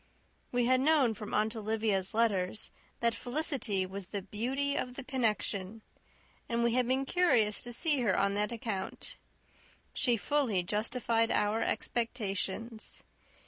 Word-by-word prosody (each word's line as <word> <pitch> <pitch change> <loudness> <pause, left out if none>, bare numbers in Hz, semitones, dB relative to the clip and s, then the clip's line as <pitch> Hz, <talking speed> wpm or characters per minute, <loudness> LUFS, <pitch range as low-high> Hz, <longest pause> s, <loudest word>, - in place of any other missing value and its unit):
We 245 -1 +2
had 255 +1 +4
known 280 -5 +4
from 210 0 -8
Aunt 215 +2 +1
Olivia's 215 -2 0
letters, 210 -3 +1 0.3
that 235 -1 +3
Felicity 245 - -1
was 190 0 -7
the 200 -1 -4
beauty 260 +8 -1
of 250 0 -2
the 275 - -6
connection, 220 -5 -1 0.7
and 235 0 +1
we 235 -1 +2
had 250 -1 +2
been 260 +2 +1
curious 245 - +3
to 240 - -4
see 295 +3 +3
her 210 -6 +2
on 200 0 +2
that 210 +2 0
account. 220 -5 -4 0.8
She 240 -3 +2
fully 235 -7 +1
justified 225 +3 +1
our 210 +2 +1
expectations. 225 -1 -1
230 Hz, 140 wpm, -31 LUFS, 210-250 Hz, 0.8 s, had